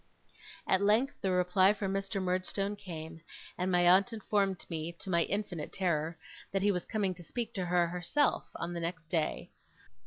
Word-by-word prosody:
At 190 - +3
length 220 +7 +2
the 190 - 0
reply 185 +2 +4
from 195 -2 -2
Mr. 195 +1 -2
Murdstone 185 +2 -1
came, 165 -4 -8 0.3
and 185 +1 -1
my 175 -1 +4
aunt 190 +6 +6
informed 200 -3 0
me, 165 0 -4
to 185 +2 -7
my 170 -1 +3
infinite 190 -6 -3
terror, 165 -3 -1 0.3
that 195 0 0
he 205 - +4
was 180 -2 -2
coming 200 -4 0
to 175 0 -12
speak 235 +7 -4
to 185 -3 -2
her 175 0 +3
herself 180 - +1
on 175 - -4
the 170 - -3
next 165 -1 -4
day. 160 -4 -1
185 Hz, 180 wpm, -32 LUFS, 170-200 Hz, 0.3 s, aunt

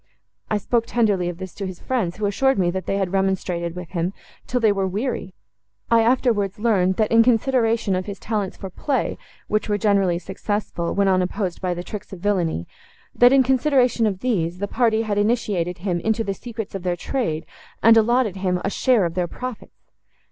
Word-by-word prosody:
I 215 - +1
spoke 230 +3 0
tenderly 205 -7 +1
of 175 - -6
this 190 -1 -7
to 195 - -5
his 185 -2 -8
friends, 215 -10 -2
who 215 - -1
assured 265 +7 +2
me, 175 -2 +2
that 190 +1 -5
they 195 - 0
had 190 -2 -1
remonstrated 185 -3 -1
with 180 -2 -7
him, 175 +1 -2 0.3
till 250 - 0
they 220 -3 +4
were 195 -1 0
weary. 200 -1 -3 0.6
I 230 0 +6
afterwards 225 -5 +1
learned, 195 -4 +2
that, 215 +1 0
in 230 0 +7
consideration 230 -3 +2
of 185 +1 -3
his 200 -1 -5
talents 210 -4 -3
for 195 -2 -7
play, 275 +8 -2 0.3
which 215 0 -1
were 205 - +2
generally 200 -4 +2
successful, 190 -1 -3
when 200 -1 +2
unopposed 185 0 0
by 180 -1 -1
the 175 - -5
tricks 210 +2 -8
of 190 - -8
villany,—that 190 - 0
in 270 -1 +6
consideration 255 -3 +2
of 195 -3 -3
these, 180 -9 0
the 200 +2 -3
party 225 -1 +2
had 205 -2 -1
initiated 205 -6 0
him 180 -1 -2
into 220 +4 0
the 200 -2 -2
secrets 225 0 -7
of 195 - -4
their 175 -1 -1
trade, 175 - -2 0.4
and 230 0 +8
allotted 225 -2 +3
him 185 -1 0
a - - 0
share 245 -6 +3
of 170 - -2
their 180 0 -1
profits." 255 +4 -9
200 Hz, 195 wpm, -22 LUFS, 185-230 Hz, 0.6 s, and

